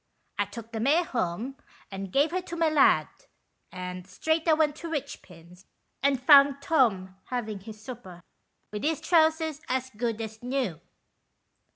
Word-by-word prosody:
" - - -30
I 205 - +3
took 225 +3 -10
the 225 - -4
mare 290 +9 +3
home 240 - -3 0.3
and 195 -1 -6
gave 290 +6 +3
her 370 +1 -1
to 345 -1 -7
my 330 -1 +2
lad, 300 -3 +4 0.6
and 180 0 -7
straight 320 - -1
I 320 - +6
went 305 -2 +2
to 335 - -7
Richpin's, 185 - -8 0.3
and 275 -1 +2
found 280 +1 +7
Tom 220 - +1
havin' 220 -5 -4
his 215 +2 -11
supper, 215 -7 -10 0.5
with 210 0 -5
his 315 0 0
trousers 320 -2 +2
as 260 0 -1
good 230 0 -3
as 220 -1 -6
new." 245 - -2
255 Hz, 160 wpm, -27 LUFS, 205-305 Hz, 0.6 s, found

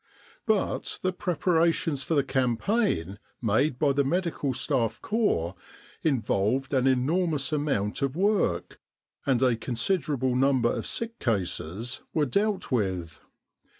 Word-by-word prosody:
But 215 -3 0
the 185 0 +1
preparations 165 -4 +1
for 160 - -1
the 140 - +3
campaign 130 - 0 0.2
made 125 +5 +1
by 145 +1 +3
the 140 +1 +2
Medical 165 -2 -1
Staff 125 -3 0
Corps 205 - 0 0.5
involved 130 -2 0
an 130 -1 +3
enormous 145 +2 +1
amount 140 -9 -1
of 140 0 0
work, 185 - 0 0.5
and 130 -2 +3
a 125 -2 +4
considerable 130 +2 0
number 130 -2 +3
of - - -3
sick 230 0 -3
cases 100 - -2
were 155 -2 +3
dealt 200 - 0
with. 95 - -1
135 Hz, 120 wpm, -27 LUFS, 115-165 Hz, 0.5 s, a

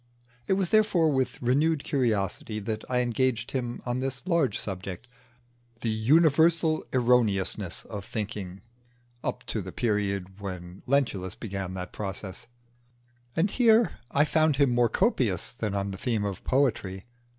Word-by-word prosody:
It 195 - +3
was 190 -2 0
therefore 200 -7 +4
with 130 -2 0
renewed 145 +5 +2
curiosity 110 -5 -1
that 110 +1 -3
I 125 -1 +2
engaged 120 -1 0
him 120 -3 -3
on 120 0 -1
this 135 +2 -3
large 170 -7 +2
subject 95 +2 -5 0.7
the 115 - 0
universal 160 +7 +4
erroneousness 110 -7 +1
of 105 -3 -6
thinking 105 -4 -5 0.6
up - - -3
to 110 - -2
the 95 0 -7
period 100 -4 -1
when 90 -2 -7
Lentulus 110 -9 0
began 95 -3 -5
that 90 -1 -6
process. 100 +2 -6 0.9
And 185 +5 +2
here 230 -2 +4
I 145 +2 +3
found 155 -1 +3
him 140 -3 +4
more 120 -1 +3
copious 120 - +1
than 110 -4 -3
on 100 0 -1
the 95 - -7
theme 110 -4 0
of 100 -3 -4
poetry. 110 -8 0
120 Hz, 140 wpm, -27 LUFS, 100-140 Hz, 0.9 s, therefore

